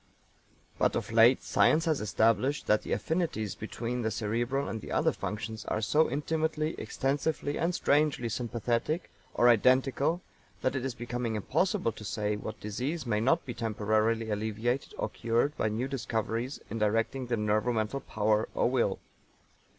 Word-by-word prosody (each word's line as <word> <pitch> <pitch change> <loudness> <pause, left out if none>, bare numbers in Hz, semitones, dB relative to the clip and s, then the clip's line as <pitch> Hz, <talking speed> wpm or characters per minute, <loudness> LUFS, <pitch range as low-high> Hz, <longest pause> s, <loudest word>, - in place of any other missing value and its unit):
But - - +2
of - - -3
late 115 +3 +6
science 160 +1 +3
has 155 -6 +1
established 115 +7 +2
that 105 - +3
the - - -7
affinities 160 - -1
between 120 +3 -4
the 110 - 0
cerebral 120 +6 -1
and 110 -2 -5
other - - +2
functions 110 0 -5
are - - -1
so 150 +9 +3
intimately, 155 +2 -1
extensively 145 +5 -1
and 170 +2 +1
strangely 145 -6 +2
sympathetic 120 - -2 0.2
or 120 - +5
identical 130 - +3 0.4
that 130 - +1
it 130 - -2
is 135 -2 -3
becoming 120 -1 -3
impossible 165 - 0
to 110 - -11
say 105 0 -1
what 110 +1 -6
disease 130 +9 -3
may 105 -3 +1
not 160 +9 +2
be 120 - -4
temporarily 110 0 0
alleviated 110 +5 -2
or - - -1
cured 120 +6 0
by 110 - 0
new 115 +5 -2
discoveries 115 0 -2
in 115 - -3
directing 115 +5 0
the 120 -1 0
nervo 105 +3 +1
mental 110 +3 -1
power 110 -2 0
or 120 - +2
will. 120 -7 +1
120 Hz, 155 wpm, -30 LUFS, 110-135 Hz, 0.4 s, late